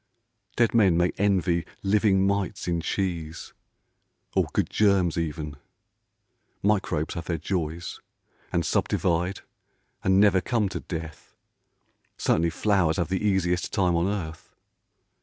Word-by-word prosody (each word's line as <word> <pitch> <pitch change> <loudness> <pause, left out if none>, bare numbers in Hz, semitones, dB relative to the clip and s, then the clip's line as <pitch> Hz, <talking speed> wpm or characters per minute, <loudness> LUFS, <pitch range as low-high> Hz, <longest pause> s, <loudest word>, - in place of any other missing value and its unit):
Dead 120 -1 +2
men 100 -7 +4
may 90 +1 +2
envy 90 -4 +2 0.2
living 100 -1 +3
mites 100 -1 -1
in 85 -1 0
cheese, 85 -4 -3 0.8
Or - - +2
good - - +1
germs 100 -5 +2
even. 75 -3 -3 1.1
Microbes 95 -7 +1
have 85 - -5
their 85 -1 -1
joys, 85 0 -3 0.5
And 85 -1 0
subdivide, 90 +3 0 0.6
and 95 +1 +4
never 100 -2 +5
come 110 -2 0
to - - -4
death, 80 -3 -8 0.8
Certainly 85 +1 +2
flowers 95 -2 +1
have 85 -2 -1
the 95 +2 -1
easiest 90 -4 +1
time 90 -4 +2
on 85 +2 +1
earth. 85 -6 -5
90 Hz, 120 wpm, -26 LUFS, 85-100 Hz, 1.1 s, never